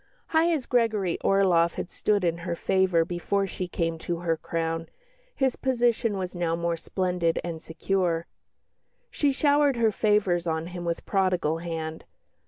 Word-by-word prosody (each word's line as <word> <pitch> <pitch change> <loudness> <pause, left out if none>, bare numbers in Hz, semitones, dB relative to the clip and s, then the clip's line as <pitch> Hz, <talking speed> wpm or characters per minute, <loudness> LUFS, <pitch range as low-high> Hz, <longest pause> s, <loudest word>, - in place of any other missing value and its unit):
High 330 +1 +3
as 300 -7 -1
Gregory 215 -7 +1
Orloff 180 -4 +3
had - - -5
stood 205 -2 +1
in 170 -1 0
her 170 0 -3
favour 185 -2 +2
before 180 +3 -1
she 185 -1 -4
came 165 -1 -2
to 170 +1 -3
her 165 -2 +1
crown, 165 0 -3 0.5
his 265 -2 +1
position 240 -4 +1
was 185 -1 -4
now 170 -2 0
more 170 0 -1
splendid 180 0 -1
and 165 -2 -5
secure. 170 0 -1 0.9
She 290 -2 +2
showered 285 0 +3
her 230 -2 +3
favours 200 -5 +1
on 160 0 -1
him 175 -1 -5
with 170 0 -2
prodigal 180 -5 +1
hand. 160 -2 -5
180 Hz, 155 wpm, -26 LUFS, 165-210 Hz, 0.9 s, High